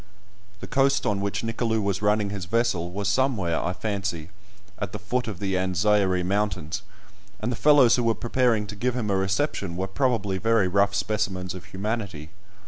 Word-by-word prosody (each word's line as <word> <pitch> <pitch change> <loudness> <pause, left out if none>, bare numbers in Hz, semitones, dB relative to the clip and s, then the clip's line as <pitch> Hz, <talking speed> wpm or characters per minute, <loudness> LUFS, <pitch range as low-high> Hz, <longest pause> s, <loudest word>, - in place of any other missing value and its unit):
The - - -6
coast 135 0 +2
on 100 -2 0
which 100 +2 -2
Nicolou 115 0 0
was 100 -1 -1
running 105 -1 +2
his 100 -3 -5
vessel 95 -4 0
was 100 +2 -3
somewhere, 105 -7 +1
I - - 0
fancy, 95 -5 -3 0.5
at 100 -2 -4
the - - -3
foot 125 +4 -2
of 105 -5 -4
the 95 -1 -2
Anzairie 95 0 +2
Mountains, 95 -3 -1 0.6
and 115 +3 -2
the - - -2
fellows 140 -3 +5
who 120 - 0
were 115 -1 +3
preparing 120 -3 +1
to 105 - -8
give 125 +4 -1
him 110 -5 -1
a - - +2
reception 95 - -1
were 95 - -1
probably 100 -3 0
very 115 -2 +3
rough 100 +2 +2
specimens 95 -3 -1
of 90 - -9
humanity. 95 -6 -4
100 Hz, 180 wpm, -25 LUFS, 95-115 Hz, 0.6 s, fellows